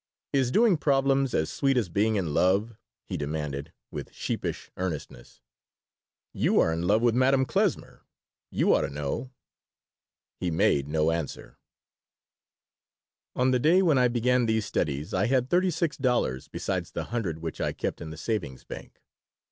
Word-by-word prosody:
"Is 135 -3 +2
doing 215 - +4
problems 135 -2 +2
as 80 - 0
sweet 135 -2 +1
as 115 -6 +1
being 105 +5 +1
in 85 -7 -1
love?" 100 +7 +2 0.3
he - - -4
demanded, 75 0 -4 0.2
with - - -6
sheepish - - -4
earnestness 80 -9 -6 0.9
"You - - +2
are 80 - +3
in 85 +2 -2
love 110 +4 +3
with 120 -1 +4
Madame 130 +2 +3
Klesmer. - - -1 0.5
You - - +2
ought - - +3
to - - -2
know." 75 - -4 1.1
He 90 - -1
made 70 -3 +2
no 80 +1 +1
answer 80 -3 -5 1.8
On 130 +1 +2
the 125 - +2
day 170 +8 +4
when 155 -7 +4
I 125 - +5
began 125 0 +2
these 110 -1 +1
studies 75 -2 -2
I 95 +2 +2
had 130 0 +1
thirty 185 +1 +3
six 165 -2 -1
dollars 125 - 0
besides 90 -3 -3
the - - -2
hundred 95 -10 -1
which 80 -1 -6
I - - 0
kept - - -4
in 80 - -6
the 80 - -8
savings 80 - -3
bank. - - -10
110 Hz, 160 wpm, -27 LUFS, 80-130 Hz, 1.8 s, I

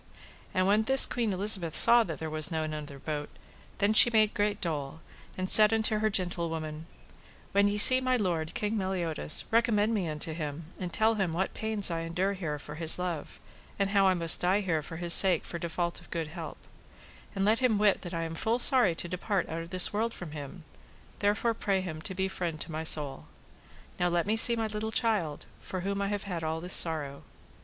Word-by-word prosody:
And 185 - -1
when 205 +3 +2
this 265 +4 +3
Queen 235 -4 -3
Elizabeth 190 -4 0
saw 235 0 +5
that 160 -3 -7
there 160 - -6
was 155 0 +2
none 160 -2 -4
other 150 -2 -8
bote, 150 +1 -6 0.5
then 200 +2 0
she 230 - +6
made 215 -2 +1
great 205 0 -2
dole, 150 -3 -5 0.4
and 185 0 -4
said 215 +2 +9
unto 220 -1 0
her 215 0 0
gentlewoman: 165 -4 -3 0.6
When 200 +1 +2
ye 205 0 -2
see 255 +5 +8
my 255 0 0
lord, 170 -7 -3
King 210 +1 -3
Meliodas, 175 -5 0
recommend 225 -1 +1
me 195 -6 -2
unto 155 +1 -5
him, 155 0 -7
and 180 -2 -6
tell 220 +3 +1
him 190 -6 -3
what 190 +3 -3
pains 220 -4 0
I 165 - -3
endure 175 +4 -3
here 165 -6 -5
for 150 +1 -11
his 160 +1 +1
love, 175 -4 -6 0.4
and 195 -1 -2
how 200 -1 +2
I 185 - +2
must 170 -1 +6
die 185 +3 +1
here 170 -5 -2
for 165 +2 -10
his 170 0 +3
sake 185 -4 +6
for 170 - -7
default 170 +1 -4
of - - -18
good 165 -2 -5
help; 165 0 -9 0.8
and 195 0 -1
let 220 +2 +1
him 250 -5 +1
wit 205 -1 +1
that 175 - -9
I 165 - -3
am 165 0 -6
full 220 +8 -2
sorry 245 - +5
to 175 - -4
depart 185 +2 -3
out 165 +1 -5
of 165 - -10
this 185 +2 +3
world 225 +2 -3
from 175 -4 -9
him, 150 +3 -10 0.6
therefore 210 +3 0
pray 200 -3 -2
him 165 -4 -7
to 190 - -8
be 190 +1 -2
friend 175 -4 -5
to - - -5
my 160 +1 -5
soul. 145 -4 0 0.7
Now 175 - 0
let 175 -1 -1
me 215 +2 -1
see 235 +1 +6
my 225 -1 -3
little 215 +1 -5
child, 210 -11 -2
for 185 - -7
whom 200 +2 -4
I 200 - -2
have 205 0 -4
had 175 -5 -6
all 160 0 -3
this 180 +3 -3
sorrow. 150 -4 +1
185 Hz, 215 wpm, -28 LUFS, 160-210 Hz, 0.8 s, said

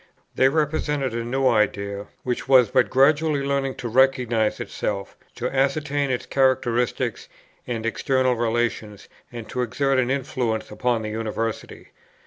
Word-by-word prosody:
They 130 - +4
represented 150 -3 -1
a 115 0 -2
new 130 +3 0
idea, 100 -3 0 0.2
which 125 +1 -3
was 130 -5 +5
but - - +3
gradually 145 +2 +3
learning 140 -1 -1
to 120 - -5
recognize 120 -3 +2
itself, 100 -1 -4 0.2
to 125 - -2
ascertain 140 +1 0
its 125 -1 -2
characteristics 130 -3 0 0.4
and 115 -2 -3
external 130 +2 +1
relations, 115 -3 -2 0.2
and 115 -2 -8
to 125 - -2
exert 135 +3 +1
an 125 -1 +1
influence 125 -5 -2
upon 120 -3 -1
the 110 - -4
University. 110 0 -4
125 Hz, 135 wpm, -23 LUFS, 115-135 Hz, 0.4 s, was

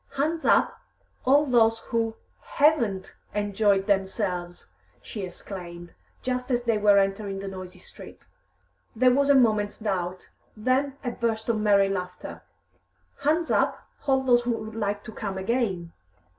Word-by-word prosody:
"Hands 315 +4 -1
up, - - +3 0.4
all 285 +3 +5
those 225 -4 +4 0.2
who 225 -1 0 0.4
haven't 240 -11 +2 0.2
enjoyed 205 -1 +2
themselves!" 190 -3 -1 0.3
she 210 - -7
exclaimed, 175 -2 -8 0.3
just 250 0 -2
as 245 -1 +1
they 230 -3 +1
were 205 -1 +5
entering 195 0 0
the 195 0 -6
noisy 185 -1 -8
streets. 180 - -12 0.7
There 250 +2 +5
was 280 +2 +2
a 285 - +6
moment's 215 -5 +3
doubt, 185 -4 -3 0.3
then 265 +5 0
a 245 - -2
burst 225 -1 -2
of 225 -2 +1
merry 200 -2 +4
laughter. 180 -2 -5 0.8
"Hands 315 +4 +1
up, - - +1 0.2
all 265 -1 +3
those 245 -2 +4
who 240 - -4
would 220 0 -8
like 205 -2 -2
to - - -9
come 200 -3 -5
again!" 190 -5 -1
215 Hz, 145 wpm, -26 LUFS, 195-250 Hz, 0.8 s, a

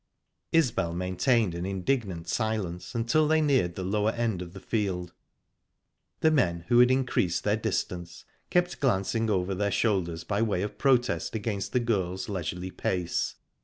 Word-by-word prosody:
Isbel 120 - +2
maintained 95 +3 +1
an 85 +1 -4
indignant 95 -2 -2
silence 110 -4 -2
until 120 +7 +2
they 160 +1 +4
neared 130 - +2
the 95 - -4
lower 105 +3 +1
end 115 -5 -1
of 90 -1 -8
the 95 - -8
field. 90 -3 -2 1.1
The 160 - +5
men, 85 - +1
who 120 -1 +5
had 125 0 +7
increased 125 -9 +1
their 105 0 +2
distance, 90 -5 -3 0.2
kept 180 0 +1
glancing 115 -2 +1
over 95 -2 0
their 100 +2 0
shoulders 90 -6 0
by 105 0 -1
way 100 -5 +1
of 105 - -6
protest 120 - +2
against 105 -2 -2
the 125 - +2
girls' 95 -5 -1
leisurely 90 -1 -4
pace. 90 -2 -1
100 Hz, 155 wpm, -28 LUFS, 90-120 Hz, 1.1 s, had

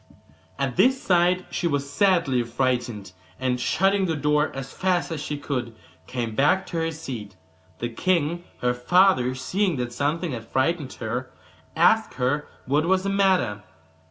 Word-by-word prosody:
At 135 -3 -2
this 260 +1 +4
sight 180 -1 +2
she 175 - -1
was 145 -3 -1
sadly 165 -5 +2
frightened, 120 -4 -2 0.3
and 125 -1 0
shutting 190 +8 +2
the 165 - 0
door 150 +1 +1
as 135 -1 -6
fast 180 -2 0
as 155 -3 -3
she 145 0 -4
could 125 -5 -4 0.3
came 120 -3 -3
back 145 +10 +3
to 170 - -5
her 165 0 0
seat. 130 -10 -7 0.4
The 120 - -3
king, 170 +4 0 0.2
her 125 0 +2
father, 130 0 +3
seeing 180 +7 0
that 120 -2 -3
something 150 +6 -1
had 115 -3 -6
frightened 140 +1 0
her, 125 +3 -4 0.5
asked - - +3
her 130 +4 0 0.2
what 145 +5 +1
was 190 0 +2
the 195 - -1
matter. 190 - +2
145 Hz, 155 wpm, -24 LUFS, 125-175 Hz, 0.5 s, this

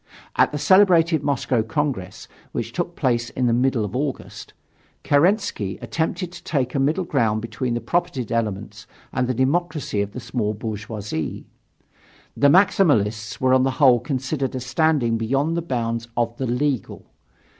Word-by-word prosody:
At - - +4
the 150 - -3
celebrated 170 -1 +4
Moscow 135 -4 0
Congress, 115 - -3 0.3
which - - -3
took - - -3
place 120 -1 0
in 130 - -2
the 120 - +3
middle 125 -2 +1
of 105 +3 -6
August, 135 0 -4 0.5
Kerensky 145 - +1
attempted 170 +2 -2
to 180 - -11
take 130 -5 -1
a 140 - 0
middle 155 +7 +1
ground 110 -10 +1
between 120 +2 -3
the 120 - -2
propertied 155 -2 -1
elements 110 -3 -3 0.3
and 125 -1 0
the 130 - -1
democracy 145 -4 0
of 100 0 -4
the - - -5
small 110 -4 -2
bourgeoisie. 105 -5 -5 0.9
The 140 - +4
Maximalists 115 - +3
were 130 0 +3
on 130 - +5
the 135 - +2
whole 130 -5 +6
considered 135 +1 -3
as 130 -1 -4
standing 135 -6 +1
beyond 135 +8 0
the 170 - 0
bounds 115 -6 -2
of 120 -1 0
the 130 - -2
"legal." 130 +1 -2
130 Hz, 155 wpm, -22 LUFS, 115-150 Hz, 0.9 s, whole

